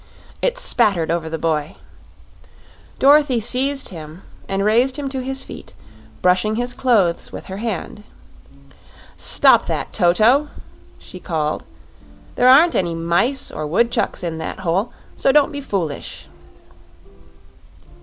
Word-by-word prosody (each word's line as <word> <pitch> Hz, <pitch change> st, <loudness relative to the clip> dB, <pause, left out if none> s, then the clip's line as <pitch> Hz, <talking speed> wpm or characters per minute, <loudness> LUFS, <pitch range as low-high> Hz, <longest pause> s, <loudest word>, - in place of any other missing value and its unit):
It -, -, 0 dB
spattered 205 Hz, -, +1 dB
over 165 Hz, -1 st, -2 dB
the 160 Hz, -, -4 dB
boy. 155 Hz, -2 st, -2 dB, 1.2 s
Dorothy 280 Hz, -2 st, +4 dB
seized 265 Hz, +5 st, 0 dB
him 160 Hz, 0 st, -10 dB, 0.3 s
and 195 Hz, +1 st, -1 dB
raised 240 Hz, +5 st, +3 dB
him 285 Hz, -2 st, -4 dB
to 265 Hz, -1 st, -4 dB
his 265 Hz, +1 st, -4 dB
feet, -, -, -11 dB, 0.5 s
brushing 185 Hz, +4 st, +2 dB
his 245 Hz, +2 st, -2 dB
clothes 205 Hz, -11 st, +1 dB
with -, -, -9 dB
her 190 Hz, -, -7 dB
hand. 210 Hz, -1 st, -5 dB, 1.1 s
"Stop -, -, +3 dB
that, -, -, -3 dB
Toto!" 220 Hz, +12 st, +3 dB, 0.5 s
she 185 Hz, -, -11 dB
called. 155 Hz, -, -3 dB, 0.7 s
"There 250 Hz, -, +3 dB
aren't 315 Hz, +6 st, +6 dB
any 170 Hz, -3 st, -1 dB
mice 175 Hz, +12 st, 0 dB
or 155 Hz, 0 st, -5 dB
woodchucks 235 Hz, +3 st, 0 dB
in 165 Hz, -2 st, -4 dB
that 175 Hz, -, -6 dB
hole, 190 Hz, +5 st, -1 dB, 0.2 s
so 270 Hz, -, +2 dB
don't 290 Hz, 0 st, +3 dB
be 285 Hz, -1 st, -5 dB
foolish." 175 Hz, -, -4 dB
210 Hz, 125 wpm, -19 LUFS, 170-265 Hz, 1.2 s, aren't